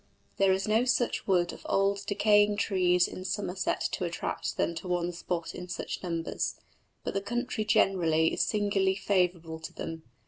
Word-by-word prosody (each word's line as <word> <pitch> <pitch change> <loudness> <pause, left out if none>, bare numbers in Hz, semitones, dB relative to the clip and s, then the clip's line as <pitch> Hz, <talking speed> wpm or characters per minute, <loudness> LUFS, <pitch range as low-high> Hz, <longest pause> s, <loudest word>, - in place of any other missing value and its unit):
There 195 -1 +4
is 190 +2 0
no 220 +3 +3
such 245 -1 0
wood 180 -3 +2
of - - -12
old 195 0 +1
decaying 205 0 +4
trees 180 -3 +3
in 185 - -7
Somerset 190 -1 -2
to - - -2
attract 170 -1 -3
them 170 - +1
to 170 +3 -7
one 175 -1 0
spot 170 -1 -4
in 180 - -7
such - - -4
numbers, 170 -3 -2 0.5
but - - -3
the 195 - 0
country 240 +1 -2
generally 165 -6 +3
is - - 0
singularly 200 -2 +1
favourable 180 -5 0
to - - -7
them. 165 0 -6
190 Hz, 170 wpm, -29 LUFS, 175-205 Hz, 0.5 s, There